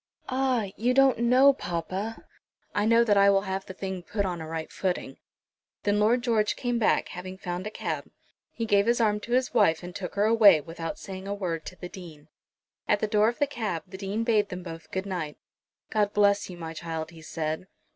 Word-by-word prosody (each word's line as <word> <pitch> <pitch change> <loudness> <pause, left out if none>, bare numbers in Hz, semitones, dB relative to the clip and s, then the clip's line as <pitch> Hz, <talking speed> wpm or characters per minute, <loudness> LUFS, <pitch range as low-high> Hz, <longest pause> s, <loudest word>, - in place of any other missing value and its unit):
"Ah! 255 -6 0
you 245 +3 +1
don't 270 -3 +5
know, 255 +4 +6
papa." 190 +2 -4 0.5
"I 205 - +1
know 230 +1 +5
that 210 -3 +3
I 200 0 +6
will 195 0 +4
have 190 0 -4
the 190 - -7
thing 190 -1 -4
put 200 +3 -2
on 175 -3 -3
a 160 - -6
right 160 0 -5
footing." 185 -2 -3 0.7
Then 205 0 +2
Lord 235 +4 +3
George 220 -4 +2
came 245 -2 -1
back, 220 - +2
having 185 +1 -7
found 180 +1 -4
a - - -2
cab. - - -4 0.4
He 230 - -3
gave 205 -1 +3
his 235 +1 +3
arm 210 -2 +2
to 235 +3 -5
his 255 0 +1
wife 190 -8 +3
and 175 0 -8
took 180 -3 -5
her 205 +1 +3
away, 215 -6 +7
without 165 +2 -6
saying 190 -1 -8
a 200 - -2
word 170 -5 -3
to - - -7
the 180 - -7
Dean. 165 -5 -12 0.6
At 210 - +3
the - - +1
door 210 +1 +3
of 240 - -5
the 290 - +3
cab 225 - -3
the 190 0 -10
Dean 200 +3 -2
bade 215 -3 +2
them 180 0 -6
both 165 -2 -9
good 190 +1 -3
night. 175 -6 -4 0.5
"God 210 -1 +1
bless 205 -1 +3
you, 180 - -8
my 165 -1 -6
child," 160 0 -5
he 165 -1 -13
said. 160 +2 -4
200 Hz, 215 wpm, -27 LUFS, 175-225 Hz, 0.7 s, away